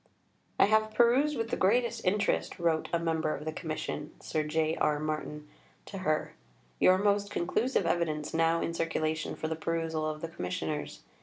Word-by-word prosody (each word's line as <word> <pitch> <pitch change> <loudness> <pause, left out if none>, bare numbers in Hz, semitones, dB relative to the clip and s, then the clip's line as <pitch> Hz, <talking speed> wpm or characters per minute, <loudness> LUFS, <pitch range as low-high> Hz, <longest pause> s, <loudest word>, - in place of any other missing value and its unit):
" - - -41 0.2
"I - - +8
have 215 +1 +2
perused 255 +6 +4
with 225 0 -2
the - - +2
greatest 235 +5 +2
interest," 200 +3 +1
wrote 165 -3 0
a 170 - +2
member 160 -2 0
of - - -8
the 155 - -1
Commission 155 -1 -5
(Sir 155 - -2
J. 155 +1 0
R. 150 - +2
Martin) 150 0 -4 0.4
to 195 - -7
her, 155 -4 0 0.5
"your 185 - +6
most 200 0 +2
conclusive 205 +5 0
evidence 155 -3 -1
now 165 0 +2
in 165 - -2
circulation 160 -1 -1
for 160 - -3
the 160 - -2
perusal 160 -1 -1
of 155 0 -5
the 165 - -3
Commissioners. 80 - -4
165 Hz, 175 wpm, -30 LUFS, 155-195 Hz, 0.5 s, I